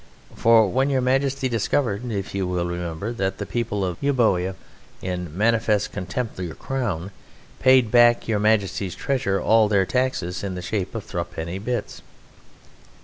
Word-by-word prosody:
For 115 -2 +5
when 130 +7 +1
Your 135 -2 +2
Majesty 135 +1 +1
discovered 120 0 -1
(if 100 -2 -4
you 95 -2 -1
will 90 -1 -1
remember) 85 +5 -4
that 95 -4 -2
the 100 - -4
people 105 -2 -2
of 90 -2 -4
Euboea, 110 -10 +1 0.4
in 90 -3 -5
manifest 110 -1 +2
contempt 100 +3 -4
of 90 - -2
your 80 - -7
Crown, 105 -9 -3 0.5
paid 130 -4 +5
back 120 -1 +6
into - - -11
Your 105 -2 +1
Majesty's 100 -3 +1
treasury 100 -8 0
all 110 -1 +4
their 100 -2 +2
taxes 100 -8 -1
in 95 -2 -3
the 90 - -5
shape 100 -1 -3
of - - -3
thruppenny 85 +4 -4
bits...." 120 +4 -4
105 Hz, 160 wpm, -23 LUFS, 95-120 Hz, 0.5 s, back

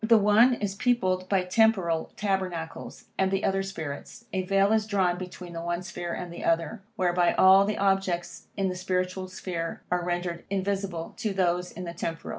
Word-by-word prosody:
The 225 +1 +6
one 215 +5 +5
is 205 -4 -2
peopled 185 -5 +1
by 195 -2 +2
temporal 180 -5 +2
tabernacles, 185 -5 -3
and 190 0 +3
the 195 0 -1
other 195 0 +1
by 195 - -2
spirits. 160 +4 -7
A 190 - +1
vail 195 +2 +2
is 215 -1 +1
drawn 190 -4 +2
between 180 -1 -8
the 165 - -5
one 175 +1 -2
sphere 175 -1 -5
and 175 0 -5
the - - -7
other, 165 +6 0
whereby 175 -1 +2
all 190 +1 +7
the 210 +1 -1
objects 195 -3 0
in 195 -1 +1
the 185 - -2
spiritual 185 0 -2
sphere 175 -2 -5
are 180 0 +1
rendered 175 -1 -2
invisible 195 -3 -2
to 220 -3 -2
those 180 -1 0
in 180 - -7
the 170 -1 -5
temporal. 165 -1 -4
185 Hz, 190 wpm, -27 LUFS, 175-195 Hz, -, all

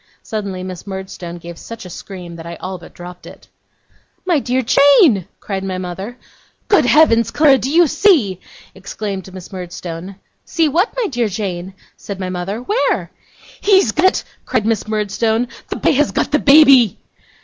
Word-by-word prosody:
Suddenly 200 -4 -4
Miss 185 +1 -8
Murdstone 190 -3 -7
gave 170 0 -10
such 230 -3 -9
a - - -8
scream 180 -2 -9
that 165 - -9
I 170 - -6
all 185 +2 -6
but 170 - -14
dropped 180 0 -11
it. - - -14 0.8
'My 345 -5 +2
dear 255 0 -1
Jane!' 275 - +5
cried 195 -2 -4
my 190 -1 -3
mother. 190 +6 -6 0.5
'Good 400 -11 +4
heavens, 235 -7 +4
Clara, 285 -3 +4
do 265 - -3
you 340 +4 +5
see?' 300 - +2 0.3
exclaimed 195 0 -6
Miss 185 +1 -11
Murdstone. 180 0 -7 0.3
'See 330 -2 +1
what, 355 - +1
my - - +1
dear 245 - -1
Jane?' 190 -2 -5 0.2
said 200 -2 -7
my 185 -1 -3
mother; 190 +5 -4
'where?' 425 - 0 0.5
'He's 385 - +4
got 310 +10 +1
it!' - - 0 0.2
cried 210 - -1
Miss 225 -2 0
Murdstone. 220 +2 0 0.2
'The - - -3
boy - - +2
has 295 +1 +2
got - - -1
the 300 - +3
baby! 275 - +6
210 Hz, 170 wpm, -17 LUFS, 185-275 Hz, 0.8 s, baby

